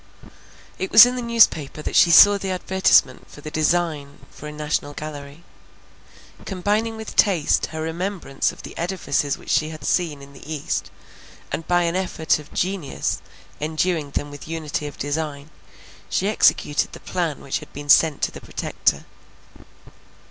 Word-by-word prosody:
It 190 - -2
was 220 +2 +11
in 250 +1 -2
the 250 - -3
newspaper 210 - +2
that - - -4
she 170 - +6
saw 205 +4 +8
the 195 - -4
advertisement 185 -7 +2
for 145 - -13
the 155 - -8
design 155 -3 -1
for 150 - -10
a - - -6
national 150 -1 -3
gallery. 150 +1 -8 1.0
Combining 210 +4 -1
with 220 -1 -8
taste 180 -8 +2
her 160 0 -5
remembrance 170 -3 -2
of - - -14
the - - -10
edifices 165 -5 -1
which - - -7
she 155 +2 +2
had 155 -2 -10
seen 155 -6 -1
in 140 0 -14
the 145 +3 -11
east, 150 -3 -3 0.6
and 165 - -4
by 175 0 +3
an 170 +1 -1
effort 180 -4 0
of 150 - -14
genius 180 -6 -2 0.4
enduing 155 0 -1
them 145 0 -3
with 145 +1 -10
unity 155 -2 -4
of 145 - -10
design, 145 0 -4 0.6
she 195 - 0
executed 150 -7 +2
the - - -9
plan 170 -5 -3
which 135 - -3
had 150 - -14
been 145 +1 -9
sent 150 0 +4
to - - +1
the - - -11
Protector. - - -2
160 Hz, 165 wpm, -22 LUFS, 145-185 Hz, 1.0 s, was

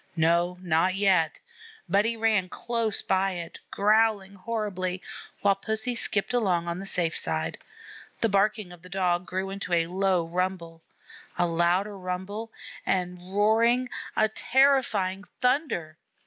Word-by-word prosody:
No, 170 +2 +2
not 175 +2 +2
yet! 185 -6 +2 0.5
but 200 +2 +3
he 230 0 -1
ran 215 -5 +2
close 230 -1 -1
by 190 0 +1
it, 170 -2 -7
growling 210 -1 +2
horribly, 185 -3 -3 0.4
while 200 -1 +4
Pussy 220 +5 -3
skipped 215 +1 -1
along 185 -8 +1
on 170 +1 -3
the 195 - -6
safe 170 -4 0
side. 80 0 -1 0.6
The 230 - +4
barking 205 -1 +1
of 175 -1 -13
the 180 - -13
Dog 180 -1 0
grew 190 +2 -3
into 195 -2 -4
a 165 -1 +3
low 185 0 +1
rumble 170 -1 -3 0.6
a 175 - +3
louder 175 +4 +1
rumble 190 +4 -5 0.3
and 180 -1 -1 0.2
roaring 230 +4 +3 0.3
a 215 - +5
terrifying 220 -6 +2 0.2
thunder. 250 - 0
190 Hz, 135 wpm, -27 LUFS, 175-215 Hz, 0.6 s, a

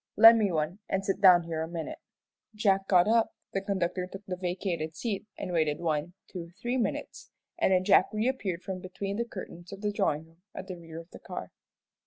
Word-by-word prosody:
"Lend 225 +1 +9
me 205 -3 +2
one, 160 +4 -1
and 195 0 0
sit 195 0 -1
down 180 -3 +8
here 165 -1 -3
a 160 - -2
minute." 165 -1 -5 0.6
Jack 195 -2 +2
got 180 -1 +5
up, 225 0 +3 0.2
the 195 - 0
conductor 185 -2 -1
took 195 +2 -10
the 185 - -3
vacated 180 -3 -3
seat, 210 +3 -3
and 180 - -4
waited 155 -3 +2
one, 165 +1 -1
two, 170 -3 -7
three 240 +3 -1
minutes, 245 - -3 0.3
and 330 - +3
then 185 -1 +4
Jack 185 -1 +6
reappeared 215 -5 -1
from 190 -1 -4
between 195 +2 -4
the 235 - 0
curtains 180 -5 -9
of 195 0 -8
the 210 -1 0
drawing 155 -6 0
room 165 +1 -24
at - - -6
the 185 -2 -6
rear 165 -1 -9
of 165 +1 -13
the - - -11
car. - - -7
185 Hz, 210 wpm, -29 LUFS, 170-200 Hz, 0.6 s, Lend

